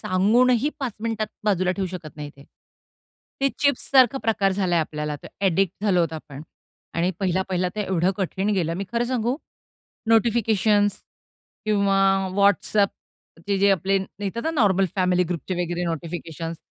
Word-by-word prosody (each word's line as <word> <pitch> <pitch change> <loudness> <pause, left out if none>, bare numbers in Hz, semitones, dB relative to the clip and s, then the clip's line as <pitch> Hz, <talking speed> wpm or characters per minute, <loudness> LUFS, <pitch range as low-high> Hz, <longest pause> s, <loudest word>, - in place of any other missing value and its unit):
सांगूनही 235 +8 +3
5 255 -5 -2
मिनिटात 220 -1 -2 0.2
बाजूला 185 -3 +2
ठेवू 190 0 -2
शकत 165 -4 -8
नाही 145 -1 -6
ते. 140 - -15 1.0
ते 275 - +3
चिप्ससारखा 270 -2 +3
प्रकार 200 -4 +1
झालाय, 185 -3 +1
आपल्याला 150 -1 -3
ते - - -9 0.2
एडिक्ट 190 +3 0
झालो 190 -4 +3
आहोत 165 -2 0
आपण 150 -2 -8 0.5
आणि 170 +2 +1
पहिला-पहिला 185 -1 0
तर - - -1
एवढं 190 -2 +1
कठीण 190 +1 -2
गेलं 165 -3 0
मी 195 - -3
खरं 235 +1 +1
सांगू, 245 0 -1 0.7
नोटिफिकेशन्स 220 -2 +3 0.7
किंवा 200 -2 +2 0.4
WhatsAppचे 200 -1 0
जे 200 +1 +4
आपले 195 +1 +2 0.3
येतात 230 +4 -3
ना 320 - 0
नॉर्मल 200 - +3
फॅमिली 180 -1 +2
ग्रुपचे 175 +1 -4
वगैरे 175 +1 -3
नोटिफिकेशन्स 165 0 -5
195 Hz, 140 wpm, -23 LUFS, 175-215 Hz, 1.0 s, जे